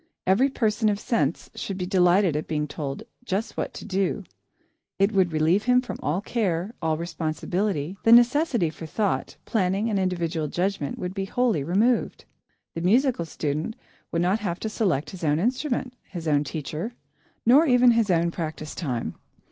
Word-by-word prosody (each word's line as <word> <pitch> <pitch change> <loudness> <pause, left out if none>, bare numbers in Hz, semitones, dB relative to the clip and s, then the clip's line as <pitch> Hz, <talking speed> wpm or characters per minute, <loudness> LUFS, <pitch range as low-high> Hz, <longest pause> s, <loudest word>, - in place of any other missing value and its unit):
Every 210 +9 +4
person 215 -4 +1
of 205 -1 0
sense 175 - -1
should 195 - -5
be 180 - -2
delighted 180 -2 +3
at 150 - -2
being 150 -1 -1
told 145 +5 -5 0.2
just 210 -1 -2
what - - -2
to - - -8
do. 195 -1 -1 0.7
It 195 +2 +3
would 190 -4 +2
relieve 160 +6 +2
him 250 0 +5
from 250 - -5
all 165 +6 -1
care, 200 -3 -1
all 160 -1 0
responsibility; 170 +1 -2
the 225 - +3
necessity 240 - +5
for 160 +1 -9
thought, 205 +5 -1
planning, 200 +1 0
and 200 - +1
individual 170 -4 -1
judgment 180 -2 -2
would 180 0 -4
be 195 -1 -2
wholly 225 - +1
removed. 210 - +1 0.5
The 165 - -4
musical 235 +1 +2
student 155 +6 -3 0.4
would 170 +1 +1
not 190 +5 +2
have 185 -5 -3
to 220 - -2
select 180 -9 0
his 185 -3 -9
own 150 -1 +2
instrument, 250 - -1
his 170 -4 -7
own 145 -1 +3
teacher, 155 - -5 0.5
nor 280 +8 +6
even 250 -1 +6
his 230 -3 +2
own 170 -1 +2
practice 155 -2 -5
time. 130 -9 -3
185 Hz, 170 wpm, -25 LUFS, 160-220 Hz, 0.7 s, nor